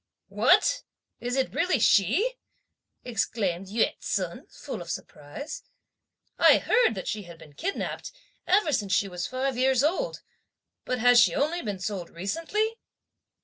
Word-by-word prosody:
'" - - -61
"What! - - +3 0.4
is 245 +1 -3
it 265 -1 0
really 350 -3 +2
she?" 300 - +3 0.7
exclaimed 200 -6 -2
Yü 220 +4 +1
ts'un - - -3
full - - -7
of - - -9
surprise. 280 - -7 0.8
"I - - +7
heard 475 - +3
that 190 - -6
she 215 -1 -2
had 170 -1 -12
been 150 -2 -15
kidnapped, 390 - -4 0.4
ever 365 -5 +3
since 200 -6 0
she 200 - +2
was 180 -2 -4
five 260 0 -2
years 260 0 +3
old; 375 +12 -1 0.6
but 255 - -1
has 245 +1 +6
she 240 - +5
only 325 +5 0
been 205 -3 -4
sold 185 -2 -4
recently?" 330 - -2
245 Hz, 145 wpm, -27 LUFS, -, 0.8 s, I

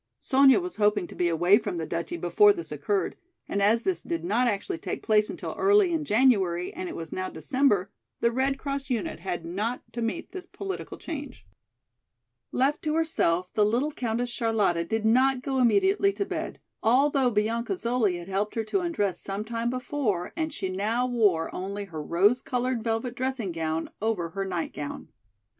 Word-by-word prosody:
Sonya 270 +1 +5
was 360 0 -6
hoping 210 -3 +2
to - - -11
be 175 -1 +1
away 175 +5 +4
from 205 -6 -4
the 160 - -2
duchy 170 +1 -3
before 175 +5 +5
this 165 -5 -7
occurred, 150 +7 -1 0.3
and 200 - -1
as 220 +4 +3
this 380 -2 0
did 165 -1 -3
not 235 +7 +2
actually 240 - -2
take - - -5
place 210 -1 +3
until - - -5
early 400 -2 +4
in 320 -2 0
January 205 -8 +2
and 185 - -5
it - - -7
was 165 -1 -7
now 185 0 -3
December, 230 -9 +1 0.3
the 235 - +3
American 260 +3 +1
Red - - -13
Cross 275 -1 -4
unit 235 -6 -2
had 175 -3 -4
not 210 +8 -3
to 235 - -4
meet 230 +9 -3
this 375 -2 -8
political 390 -1 -6
change. 295 -3 -7 1.1
Left 275 +4 +1
to 305 -1 -1
herself 185 - +1
the 210 - +3
little 240 +8 +1
Countess 240 -2 -2
Charlotta 215 -8 +1
did 220 +4 -2
not 255 +3 +3
go 270 -1 -1
immediately 390 - +4
to 400 - -2
bed, - - -4 0.2
although 265 +3 +3
Bianca 230 - 0
Zoli 235 - 0
had 175 0 -9
helped 195 +2 -2
her 225 - 0
to 220 - 0
undress 205 - -1
some 200 +2 -3
time 230 +1 -2
before 245 -7 -2
and 315 -1 -2
she 195 - -3
now 210 +6 0
wore 210 -10 +2
only 200 +2 -4
her 160 -5 -6
rose 200 +11 +3
colored 250 -2 -1
velvet 230 +2 -1
dressing 255 -6 -2
gown 160 -1 -2
over 210 -6 -1
her 195 +3 -3
night 175 -3 -3
gown. 145 -1 -6
225 Hz, 190 wpm, -27 LUFS, 190-265 Hz, 1.1 s, Sonya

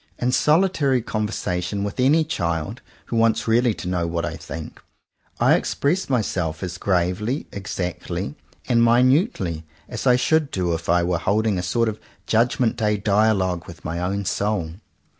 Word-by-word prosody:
In 125 +1 0
solitary 150 - +2
conversation 100 -3 -2
with 100 +3 -4
any 145 +6 +4
child, 85 - -3 0.2
who - - -4
wants 115 0 +2
really 115 0 +3
to - - -7
know 90 -2 0
what 85 0 -2
I - - -4
think, 80 -1 -8 0.6
I - - +5
express 165 +6 0
my 125 -4 +2
self 80 -5 -3
as 90 0 -5
gravely, 100 - 0
exactly, 90 -7 -4 0.3
and 115 -1 +3
minutely 120 - +2 0.2
as 120 +2 -4
I 125 - +6
should 155 +3 +2
do 90 -3 -1
if 80 +1 -4
I 85 0 +4
were 85 -1 0
holding 105 -1 +1
a - - -1
sort 115 +6 0
of 110 -1 -3 0.3
Judg 115 +2 +2
ment 120 -2 +1
Day 105 -2 +1
Dialogue 100 -4 +1
with 85 -4 -12
my 80 +2 -3
own 100 +3 -2
soul. 100 -4 -1
105 Hz, 165 wpm, -22 LUFS, 90-120 Hz, 0.6 s, I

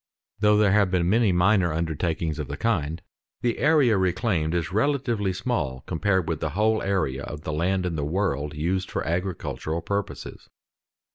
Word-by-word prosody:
Though 105 0 +4
there 105 -2 +4
have 100 -2 +4
been 90 -2 +1
many 110 +1 +3
minor 90 0 +3
undertakings 80 0 -2
of 75 - -3
the 70 - -5
kind, 85 -6 -1 0.4
the 120 -2 0
area 140 -9 +4
reclaimed 90 -3 0
is 85 0 -1
relatively 115 -3 0
small 90 - -2
compared 95 +1 0
with 80 -3 -2
the 80 - -2
whole 110 +1 +2
area 95 -9 -1
of 75 +1 -7
the 80 - -3
land 90 +4 0
in 85 -2 -2
the 75 - -1
world 75 -3 -1
used 90 +5 -1
for - - -3
agricultural 85 -2 -3
purposes. 100 -1 -4
90 Hz, 165 wpm, -25 LUFS, 80-105 Hz, 0.4 s, Though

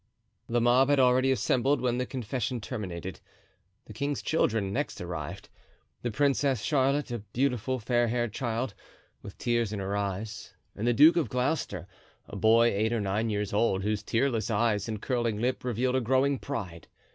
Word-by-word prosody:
The 120 +1 +2
mob 125 +3 +4
had 145 -1 +4
already 130 +1 +4
assembled 130 +2 +2
when 125 0 0
the 125 - -1
confession 125 0 -3
terminated. 95 -6 -6 0.7
The 110 - -11
king's 140 +5 -2
children 110 -10 +1
next 145 +5 -2
arrived—the 85 +7 -8
Princess 135 -1 +1
Charlotte, 140 -1 +1
a 120 - -2
beautiful, 125 +3 -1
fair 120 +1 +1
haired 120 -1 -1
child, 120 -2 -2 0.5
with - - -10
tears 120 -3 0
in 105 - -3
her 100 +1 -3
eyes, 100 +2 -4 0.2
and 110 - -2
the - - +5
Duke 155 +7 +7
of 165 - +1
Gloucester, 125 - -1 0.4
a - - -9
boy 115 +2 +5
eight 110 +3 +1
or 120 - 0
nine 105 +3 -1
years 105 -2 -2
old, 100 -3 +1
whose 105 0 -1
tearless 115 +1 0
eyes 110 -1 +1
and 110 -1 -3
curling 120 -5 0
lip 125 +3 -1
revealed 125 +1 0
a 130 - +2
growing 130 +3 +2
pride. 95 -12 -6
120 Hz, 170 wpm, -28 LUFS, 105-130 Hz, 0.7 s, Duke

